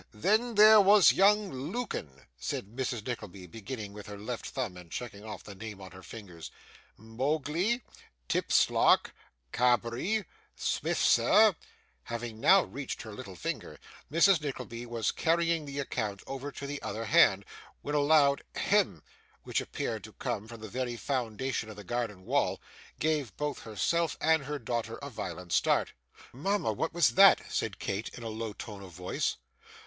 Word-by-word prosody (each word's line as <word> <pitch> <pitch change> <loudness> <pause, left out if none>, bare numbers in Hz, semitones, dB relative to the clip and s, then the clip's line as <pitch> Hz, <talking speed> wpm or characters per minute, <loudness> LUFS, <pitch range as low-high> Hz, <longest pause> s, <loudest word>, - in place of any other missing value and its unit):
Then 220 - +1
there 215 +1 +9
was 200 0 +7
young 205 +1 +4
Lukin,' 130 - -5
said 100 - -5
Mrs. 125 -4 -3
Nickleby, 100 -7 -6
beginning 110 +2 -7
with 105 0 -10
her 105 0 -7
left 110 +4 -5
thumb 120 -9 -3
and 90 -2 -12
checking 105 0 -6
off 110 -1 -8
the 105 - -9
names 105 0 -8
on 95 -2 -10
her 95 - -12
fingers 90 -4 -10 0.5
'Mogley 150 - -1 0.4
Tipslark - - +3 0.4
Cabbery 125 - +1 0.3
Smifser 215 -3 +3 0.2
' - - -38
Having 115 -2 -5
now 190 +9 +6
reached 140 -1 -6
her 110 -2 -9
little 100 -2 -9
finger, - - -5 0.3
Mrs. 170 +1 +5
Nickleby 120 -4 -5
was 115 -2 -1
carrying 165 -1 +1
the 140 0 -6
account 110 -7 -3
over 135 +1 -5
to 140 - -7
the 145 0 -5
other 110 +3 -4
hand, 100 -2 +5 0.4
when 145 - -3
a 150 - +3
loud 145 -1 +4
'Hem!' - - +1 0.4
which - - -1
appeared - - -4
to - - -13
come 105 - -4
from 115 -1 -10
the 110 - -6
very 120 +2 -3
foundation 120 -2 -2
of 110 - -9
the 105 - -10
garden 105 -3 -3
wall, - - +1 0.4
gave 150 -9 -1
both 150 0 -2
herself 160 +9 -1
and 160 -3 +2
her 150 +1 -3
daughter 120 -2 -3
a - - -6
violent 90 -2 -6
start. - - +2 0.4
'Mama! 150 - 0
what 160 +10 -2
was 170 0 +4
that?' 195 0 +7
said - - -1
Kate, 100 +4 -3
in 120 - -9
a 115 - -4
low 110 0 -4
tone 100 -1 -8
of 95 -2 -11
voice. 90 +2 -2
120 Hz, 160 wpm, -30 LUFS, 105-155 Hz, 0.5 s, there